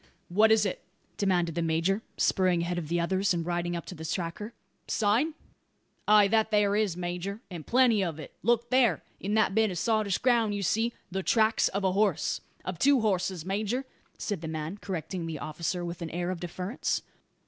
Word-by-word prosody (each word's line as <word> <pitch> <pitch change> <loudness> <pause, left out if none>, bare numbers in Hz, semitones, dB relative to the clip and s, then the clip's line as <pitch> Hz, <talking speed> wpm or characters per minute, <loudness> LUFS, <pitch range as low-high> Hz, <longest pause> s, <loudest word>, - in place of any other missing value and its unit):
"What 215 +5 +4
is 220 -1 +5
it?" 195 - -2 0.4
demanded 180 -4 +1
the 170 - -1
major, 165 +5 +1 0.2
spurring 180 -3 +2
ahead 175 0 -1
of 160 - -6
the 170 +2 0
others, 190 +2 +1
and 170 -1 -2
riding 175 0 -1
up 170 - -5
to - - -7
the 160 -2 -9
tracker. 170 +6 -3 0.4
"Sign?" 235 +9 +1 0.7
"Ay, 210 -1 +7
that 220 0 +3
there 205 -2 +3
is, 205 -5 +1
major; 180 +3 -4
and 170 -4 -7
plenty 240 -5 +4
of 165 -4 -3
it. 155 - -9
Look 235 +2 +1
there! 240 - +3 0.2
In 205 +2 -2
that 220 -3 +3
bit 220 +1 +3
of 180 - -4
sottish 215 -1 +1
ground 230 -4 +2
you 200 - -2
see 225 +5 +1
" - - -40
"The 190 +1 -1
tracks 220 +3 +3
of 200 +1 -2
a 190 - +3
horse." 195 -4 +1 0.2
"Of 185 -2 -4
two 280 +1 +4
horses, 185 -5 0
major," 215 +7 -1 0.3
said 205 -6 -3
the 160 - -5
man, 160 +5 -4
correcting 180 -2 -4
the 160 -2 -4
officer 170 +4 -3
with 170 0 -6
an 165 - -4
air 175 +2 -2
of 185 - -4
deference. 180 +6 -3
190 Hz, 200 wpm, -28 LUFS, 175-215 Hz, 0.7 s, Ay